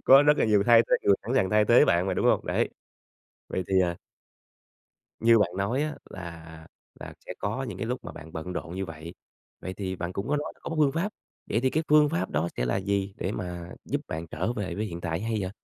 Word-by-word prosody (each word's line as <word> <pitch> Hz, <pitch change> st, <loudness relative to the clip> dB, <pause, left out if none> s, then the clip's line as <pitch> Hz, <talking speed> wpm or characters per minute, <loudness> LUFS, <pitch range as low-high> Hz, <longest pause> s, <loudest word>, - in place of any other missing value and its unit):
Có 135 Hz, +1 st, +8 dB
rất 150 Hz, 0 st, +4 dB
là -, -, +4 dB
nhiều 105 Hz, -2 st, +4 dB
thay 115 Hz, -1 st, +8 dB
thế -, -, +2 dB
người 100 Hz, -, +5 dB
sẵn 120 Hz, -, -3 dB
sàng 95 Hz, -8 st, +2 dB
thay 105 Hz, 0 st, +4 dB
thế 120 Hz, +3 st, +6 dB
bạn 85 Hz, +2 st, +2 dB
mà, 95 Hz, -, 0 dB
đúng -, -, +1 dB
hông? -, -, +3 dB
Đấy. -, -, +1 dB, 0.8 s
Vậy 95 Hz, -, -2 dB
thì, 95 Hz, -1 st, +4 dB
à 85 Hz, -1 st, 0 dB, 1.3 s
Như 115 Hz, 0 st, +6 dB
bạn 105 Hz, -5 st, +2 dB
nói 110 Hz, +8 st, 0 dB
á, 155 Hz, 0 st, -3 dB
là 80 Hz, -3 st, -9 dB, 0.3 s
là -, -, -8 dB
sẽ -, -, -4 dB
có 110 Hz, +6 st, -2 dB
những 110 Hz, -8 st, -5 dB
cái 115 Hz, -, -3 dB
lúc 125 Hz, +2 st, -3 dB
mà -, -, -7 dB
bạn 80 Hz, +1 st, -11 dB
bận 80 Hz, +3 st, -5 dB
rộn 85 Hz, -1 st, -5 dB
như 95 Hz, +1 st, -2 dB
vậy, 80 Hz, 0 st, -9 dB, 0.5 s
vậy 95 Hz, -, -5 dB
thì 95 Hz, -2 st, -4 dB
bạn 85 Hz, 0 st, -4 dB
cũng 100 Hz, +3 st, -4 dB
có 150 Hz, -, +2 dB
nói 145 Hz, -, -3 dB
có -, -, -6 dB
một 165 Hz, -, -3 dB
phương 145 Hz, -3 st, +4 dB
pháp, 175 Hz, +7 st, -1 dB, 0.3 s
vậy 115 Hz, -, 0 dB
thì 130 Hz, +1 st, +2 dB
cái 155 Hz, -, +1 dB
phương 150 Hz, 0 st, +6 dB
pháp 95 Hz, -6 st, -2 dB
đó 80 Hz, +4 st, 0 dB
sẽ -, -, 0 dB
là -, -, +1 dB
gì 100 Hz, 0 st, -1 dB
để 95 Hz, -, -2 dB
mà 90 Hz, -3 st, -5 dB
giúp -, -, -2 dB
bạn 80 Hz, +1 st, -4 dB
trở 90 Hz, +8 st, -2 dB
về 100 Hz, -6 st, -4 dB
với 105 Hz, +4 st, -2 dB
hiện 85 Hz, -5 st, -6 dB
tại 80 Hz, 0 st, -2 dB
hay 115 Hz, +1 st, -1 dB
vậy? 95 Hz, -1 st, -3 dB
95 Hz, 255 wpm, -27 LUFS, 85-115 Hz, 1.3 s, Có